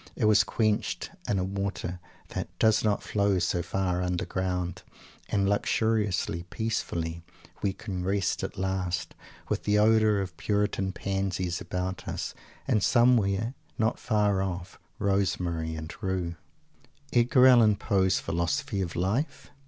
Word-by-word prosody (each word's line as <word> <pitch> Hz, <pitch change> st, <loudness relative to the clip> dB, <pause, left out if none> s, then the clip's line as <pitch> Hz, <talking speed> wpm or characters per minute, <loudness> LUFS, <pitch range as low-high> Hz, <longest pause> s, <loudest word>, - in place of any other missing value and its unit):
It -, -, 0 dB
was 105 Hz, 0 st, +6 dB
quenched 110 Hz, -3 st, 0 dB, 0.2 s
in 100 Hz, -, +2 dB
a 95 Hz, -, +1 dB
water 95 Hz, -2 st, -3 dB, 0.3 s
that -, -, -4 dB
"does 110 Hz, -1 st, +4 dB
not 105 Hz, -2 st, +1 dB
flow 100 Hz, -2 st, +1 dB
so 90 Hz, 0 st, +1 dB
far 90 Hz, 0 st, -1 dB
underground." 90 Hz, 0 st, -2 dB, 0.5 s
And 100 Hz, -1 st, +1 dB
luxuriously, 100 Hz, -4 st, +1 dB
peacefully, 85 Hz, -7 st, -2 dB, 0.4 s
we 95 Hz, -, 0 dB
can 95 Hz, -4 st, -5 dB
rest 95 Hz, 0 st, 0 dB
at -, -, -5 dB
last, 95 Hz, -1 st, -2 dB, 0.3 s
with -, -, -1 dB
the 105 Hz, 0 st, +2 dB
odour 110 Hz, -1 st, +4 dB
of 95 Hz, -1 st, -4 dB
"puritan 100 Hz, -2 st, 0 dB
pansies" 95 Hz, -2 st, -2 dB
about 90 Hz, +1 st, -4 dB
us, -, -, -3 dB, 0.3 s
and 105 Hz, -, +2 dB
somewhere, 115 Hz, -2 st, +3 dB, 0.2 s
not 110 Hz, +1 st, +1 dB
far 105 Hz, -3 st, +2 dB
off, 90 Hz, -2 st, -4 dB, 0.2 s
rosemary 90 Hz, -5 st, 0 dB
and 80 Hz, +1 st, -6 dB
rue! 95 Hz, -4 st, -2 dB, 0.8 s
Edgar 125 Hz, +2 st, +5 dB
Allen 120 Hz, -5 st, +7 dB
Poe's 95 Hz, -2 st, +2 dB
philosophy 85 Hz, +3 st, -1 dB
of 90 Hz, -2 st, -3 dB
Life? 115 Hz, -, -1 dB
95 Hz, 130 wpm, -28 LUFS, 90-105 Hz, 0.8 s, Allen